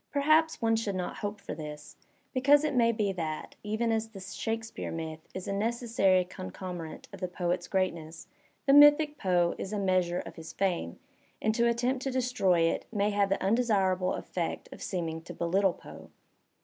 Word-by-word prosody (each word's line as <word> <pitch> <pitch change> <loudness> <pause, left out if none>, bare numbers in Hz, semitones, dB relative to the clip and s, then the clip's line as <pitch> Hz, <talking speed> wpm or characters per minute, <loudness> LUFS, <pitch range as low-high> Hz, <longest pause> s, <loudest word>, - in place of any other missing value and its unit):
Perhaps 310 +1 +3
one 225 0 +3
should 220 -3 -2
not 180 -1 -3
hope 205 0 -4
for - - -6
this, 150 -1 -8 0.4
because 280 +3 +5
it 305 - 0
may 235 -2 +4
be 215 -3 0
that, 160 -4 -4
even 220 +2 -1
as 225 0 -1
the 210 -3 -10
Shakespeare 225 +4 -4
myth 160 -1 -5 0.2
is 185 - -5
a 200 - -1
necessary 215 -3 +2
concomitant 170 - -7
of 195 - -8
the 185 - -2
poet's 175 0 -2
greatness, 170 -4 -2 0.4
the 275 - +5
mythic 295 +1 +7
Poe 175 -2 +2
is 195 - -4
a 210 - -2
measure 185 -3 +1
of - - -11
his 160 -1 -9
fame, 175 - -1 0.4
and 220 - +1
to 235 +1 +3
attempt 245 +2 0
to 270 - -2
destroy 250 -9 +2
it 165 - +1
may 205 -1 +1
have 200 -1 +2
the 195 - 0
undesirable 195 -4 +2
effect 170 -2 -4
of - - -11
seeming 165 -3 -3
to 170 - -10
belittle 185 +2 +2
Poe. - - -12
195 Hz, 180 wpm, -29 LUFS, 175-230 Hz, 0.4 s, mythic